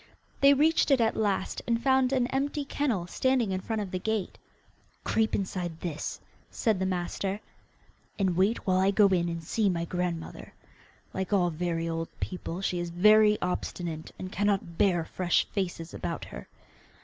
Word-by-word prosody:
They 280 Hz, 0 st, +7 dB
reached 315 Hz, +4 st, +3 dB
it 275 Hz, -2 st, +5 dB
at 225 Hz, -1 st, +2 dB
last, 200 Hz, -3 st, -1 dB
and 230 Hz, -1 st, +2 dB
found 265 Hz, 0 st, +3 dB
an 255 Hz, -2 st, +2 dB
empty 285 Hz, +2 st, -1 dB
kennel 250 Hz, -11 st, -1 dB
standing 250 Hz, +3 st, +1 dB
in 185 Hz, 0 st, -2 dB
front 220 Hz, +1 st, -2 dB
of 190 Hz, -, -8 dB
the 185 Hz, -, -2 dB
gate. 220 Hz, 0 st, -2 dB, 0.6 s
'Creep 220 Hz, 0 st, +1 dB
inside 180 Hz, -4 st, -3 dB
this,' 165 Hz, -4 st, -4 dB, 0.3 s
said 220 Hz, -6 st, 0 dB
the 190 Hz, -, 0 dB
master, 190 Hz, +2 st, -2 dB, 0.8 s
'and 190 Hz, -3 st, +1 dB
wait 195 Hz, +6 st, +1 dB
while 185 Hz, -1 st, +3 dB
I 190 Hz, +1 st, +4 dB
go 205 Hz, +1 st, +5 dB
in 175 Hz, -2 st, +1 dB
and 165 Hz, -1 st, -4 dB
see 205 Hz, +5 st, +1 dB
my 170 Hz, -2 st, -1 dB
grandmother. 175 Hz, -1 st, -4 dB, 0.6 s
Like 190 Hz, 0 st, -3 dB
all 180 Hz, -4 st, +3 dB
very 165 Hz, 0 st, -2 dB
old 165 Hz, 0 st, -2 dB
people, 180 Hz, -1 st, -4 dB
she 180 Hz, -2 st, -1 dB
is 175 Hz, 0 st, -3 dB
very 210 Hz, +4 st, +5 dB
obstinate, 170 Hz, -3 st, -3 dB
and 185 Hz, 0 st, -6 dB
cannot 195 Hz, -4 st, -1 dB
bear 175 Hz, -5 st, +3 dB
fresh 175 Hz, 0 st, +1 dB
faces 175 Hz, -4 st, -3 dB
about -, -, -4 dB
her. -, -, -9 dB
190 Hz, 170 wpm, -28 LUFS, 175-220 Hz, 0.8 s, They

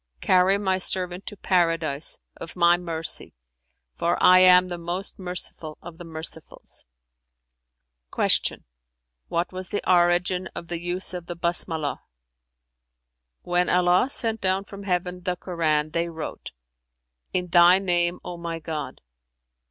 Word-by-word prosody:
Carry 185 Hz, +2 st, +4 dB
My 190 Hz, -2 st, 0 dB
servant 180 Hz, 0 st, 0 dB
to 205 Hz, -, -5 dB
Paradise, 165 Hz, -6 st, 0 dB, 0.2 s
of 165 Hz, -, -8 dB
My 170 Hz, -1 st, +5 dB
mercy, 165 Hz, -, -2 dB, 0.6 s
for 170 Hz, +1 st, 0 dB
I 185 Hz, 0 st, +7 dB
am 180 Hz, 0 st, +7 dB
the 175 Hz, -1 st, -6 dB
most 175 Hz, +4 st, -3 dB
Merciful 180 Hz, -4 st, -4 dB
of 170 Hz, 0 st, -12 dB
the -, -, -8 dB
mercifuls!'" 160 Hz, -1 st, -8 dB, 1.3 s
Q -, -, +1 dB, 0.6 s
"What 170 Hz, +1 st, -1 dB
was 185 Hz, 0 st, -5 dB
the 205 Hz, -, -3 dB
origin 180 Hz, +1 st, +2 dB
of 170 Hz, -, -8 dB
the 170 Hz, -1 st, -2 dB
use 180 Hz, +2 st, -2 dB
of 175 Hz, -1 st, -7 dB
the 175 Hz, -, -5 dB
Basmalah?" 170 Hz, -3 st, -1 dB, 1.4 s
"When 175 Hz, 0 st, +1 dB
Allah 180 Hz, +6 st, +3 dB
sent 225 Hz, -5 st, -3 dB
down 190 Hz, +1 st, 0 dB
from 200 Hz, 0 st, -11 dB
Heaven 180 Hz, -1 st, -2 dB
the 180 Hz, 0 st, -2 dB
Koran, 155 Hz, -4 st, -1 dB
they 170 Hz, +1 st, -1 dB
wrote, 160 Hz, -2 st, -7 dB, 0.8 s
'In 180 Hz, -1 st, -1 dB
Thy 175 Hz, +1 st, +6 dB
name, 175 Hz, -2 st, 0 dB
O 175 Hz, -, -6 dB
my 170 Hz, -1 st, -5 dB
God!' 160 Hz, -1 st, -6 dB
175 Hz, 135 wpm, -24 LUFS, 170-185 Hz, 1.4 s, I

